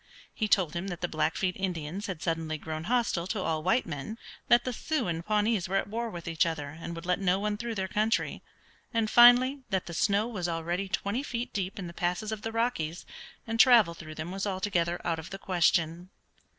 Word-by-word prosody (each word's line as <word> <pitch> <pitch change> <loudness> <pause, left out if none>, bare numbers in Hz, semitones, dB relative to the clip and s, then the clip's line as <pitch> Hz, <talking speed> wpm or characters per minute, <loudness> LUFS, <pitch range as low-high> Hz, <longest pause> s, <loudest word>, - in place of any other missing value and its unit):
He 215 - -1
told 185 -6 +3
him 175 +3 -3
that 175 -3 -5
the 175 - 0
Blackfeet 170 +3 0
Indians 185 +1 -3
had 180 -5 -5
suddenly 165 -2 -1
grown 155 +1 -5
hostile 230 -7 +1
to 210 0 -2
all 160 -1 -1
white 230 +10 +2
men, 160 +8 -5 0.3
that 240 +1 +5
the 255 - -3
Sioux 285 - -1
and 165 -1 -2
Pawnees 210 -2 +1
were 195 - -1
at 195 - +2
war 230 +3 -3
with 175 -5 -8
each 165 0 +2
other, 160 -4 -2
and 165 +3 -7
would 165 +1 -8
let 180 0 +1
no 190 -1 +2
one 210 0 -1
through 230 +1 -4
their 190 -2 -1
country, 215 +4 0 0.5
and 225 -2 0
finally 245 +3 +7
that 190 -1 0
the 170 - -7
snow 200 +5 +2
was 195 -7 -3
already 170 +3 -2
twenty 200 +6 -1
feet 240 -4 -4
deep 190 -1 -3
in 195 - -5
the 170 - -7
passes 180 +5 -2
of 215 -1 -4
the 225 - -4
Rockies, 225 -9 -1 0.4
and 225 0 -3
travel 230 -9 +7
through 155 -2 -10
them 160 +3 -5
was 195 +2 -3
altogether 185 -3 0
out 165 -1 0
of 160 - -8
the 195 - -6
question. 175 -2 +1
185 Hz, 215 wpm, -29 LUFS, 170-220 Hz, 0.5 s, finally